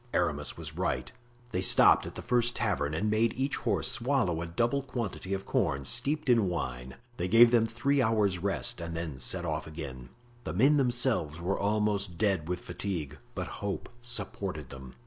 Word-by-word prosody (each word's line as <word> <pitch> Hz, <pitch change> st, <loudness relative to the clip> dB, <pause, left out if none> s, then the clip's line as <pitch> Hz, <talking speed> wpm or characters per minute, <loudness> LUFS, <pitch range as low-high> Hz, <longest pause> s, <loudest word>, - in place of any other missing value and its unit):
Aramis 75 Hz, -4 st, 0 dB
was -, -, -7 dB
right; 65 Hz, 0 st, -2 dB, 0.4 s
they 90 Hz, -, -1 dB
stopped 95 Hz, -, +6 dB
at -, -, -9 dB
the -, -, -7 dB
first 120 Hz, -1 st, +1 dB
tavern 75 Hz, +1 st, -1 dB
and 100 Hz, +7 st, -1 dB
made 110 Hz, +1 st, +2 dB
each 135 Hz, +2 st, -1 dB
horse -, -, 0 dB
swallow 120 Hz, -, 0 dB
a 85 Hz, -, -4 dB
double 120 Hz, +11 st, 0 dB
quantity 115 Hz, -7 st, -5 dB
of 95 Hz, -, -6 dB
corn 70 Hz, 0 st, 0 dB
steeped 145 Hz, -, +1 dB
in 115 Hz, -6 st, +4 dB
wine; 65 Hz, -7 st, -4 dB, 0.2 s
they 90 Hz, -, -1 dB
gave 115 Hz, +4 st, +7 dB
them 115 Hz, -2 st, +4 dB
three 135 Hz, +5 st, +1 dB
hours' 105 Hz, -5 st, +2 dB
rest 95 Hz, -1 st, -1 dB
and 85 Hz, 0 st, -5 dB
then 80 Hz, -6 st, -5 dB
set 85 Hz, +7 st, -1 dB
off 80 Hz, -1 st, -3 dB
again. 70 Hz, -6 st, -8 dB, 0.3 s
The 75 Hz, -, -4 dB
men 135 Hz, -, +4 dB
themselves 120 Hz, -, +1 dB
were 90 Hz, +3 st, -1 dB
almost 100 Hz, -3 st, 0 dB
dead 95 Hz, -6 st, 0 dB
with 90 Hz, 0 st, -2 dB
fatigue, 80 Hz, -8 st, -5 dB, 0.2 s
but -, -, -3 dB, 0.2 s
hope 100 Hz, -1 st, -3 dB
supported 100 Hz, -, -3 dB
them. 65 Hz, -2 st, -10 dB
95 Hz, 180 wpm, -29 LUFS, 80-115 Hz, 0.4 s, gave